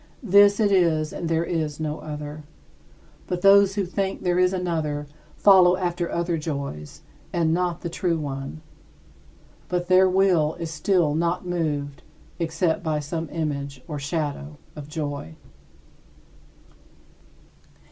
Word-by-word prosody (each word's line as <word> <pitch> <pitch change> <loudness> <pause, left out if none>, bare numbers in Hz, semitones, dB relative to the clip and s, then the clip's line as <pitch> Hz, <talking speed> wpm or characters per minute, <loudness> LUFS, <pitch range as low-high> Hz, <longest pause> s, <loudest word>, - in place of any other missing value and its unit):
This 200 0 +5
it 210 -2 +3
is 165 -5 +2
and 170 - -4
there 165 0 +1
is 160 -3 -2
no 155 -1 -3
other. 150 0 -7 0.9
But 180 -1 -3
those 195 0 +6
who 200 -2 0
think 190 +2 -3
there 180 -1 +1
is 180 0 +4
another 160 -5 -2 0.3
follow 185 -3 +6
after 175 -1 -2
other 170 -1 -1
joys, 140 - -6 0.3
and 165 -2 +1
not 175 -1 -1
the - - -4
true 170 0 -1
one. 140 +1 -6 1.1
But 175 0 -2
their 185 +1 +6
will 180 -5 +2
is 165 -2 -5
still 160 -1 +1
not 170 +3 -1
moved 150 -5 -2 0.4
except 165 0 0
by 155 -3 -1
some 160 +2 -4
image 140 -4 -4
or 150 -3 -5
shadow 145 0 -4 0.2
of 150 -2 -8
joy. 145 - -5
165 Hz, 130 wpm, -24 LUFS, 150-180 Hz, 1.1 s, those